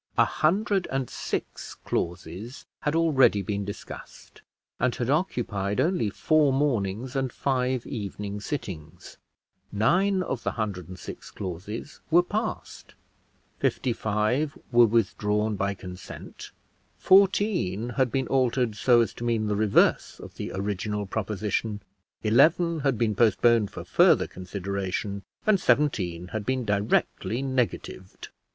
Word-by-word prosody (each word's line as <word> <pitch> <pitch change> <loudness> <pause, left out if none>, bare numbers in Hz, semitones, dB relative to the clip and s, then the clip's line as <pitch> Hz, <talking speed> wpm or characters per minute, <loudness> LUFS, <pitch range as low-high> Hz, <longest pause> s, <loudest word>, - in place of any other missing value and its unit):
A - - +6
hundred 195 +3 +1
and 135 -2 -2
six - - -5
clauses 90 - -4
had 150 +1 -1
already 135 -11 +4
been 100 +1 -2
discussed 100 - -10 0.4
and 125 0 +1
had 125 +1 -1
occupied 110 - -1
only 160 - +1
four 150 +6 +3
mornings 125 -3 -1
and 135 -2 0
five 130 -2 -1
evening 105 -3 -5
sittings; 85 - -6 0.5
nine 185 - +2
of 130 -8 -3
the - - -2
hundred 100 -7 -3
and 90 0 -9
six - - -9
clauses 100 - -6
were 175 +2 +5
passed, 215 +5 -5 0.6
fifty 125 - 0
five 110 +8 0
were 120 -1 +6
withdrawn 105 -1 +1
by 100 0 -1
consent, 90 -1 -9 0.5
fourteen 185 - +3
had 130 -1 0
been 135 +1 0
altered 125 -3 +1
so 120 +3 +4
as 115 - -1
to - - -8
mean 115 -2 0
the 105 -1 0
reverse 105 -1 +2
of - - -10
the - - -6
original 105 +1 -2
proposition, 105 +1 -2 0.4
eleven 160 +9 +4
had 135 -4 +1
been 110 -1 +1
postponed 115 0 +3
for - - -8
further - - +4
consideration, 100 +1 -4 0.2
and 215 -3 +4
seventeen 95 - +1
had 110 +1 -3
been 130 +1 -1
directly 105 +3 0
negatived. 125 -7 -3
115 Hz, 130 wpm, -26 LUFS, 100-135 Hz, 0.6 s, A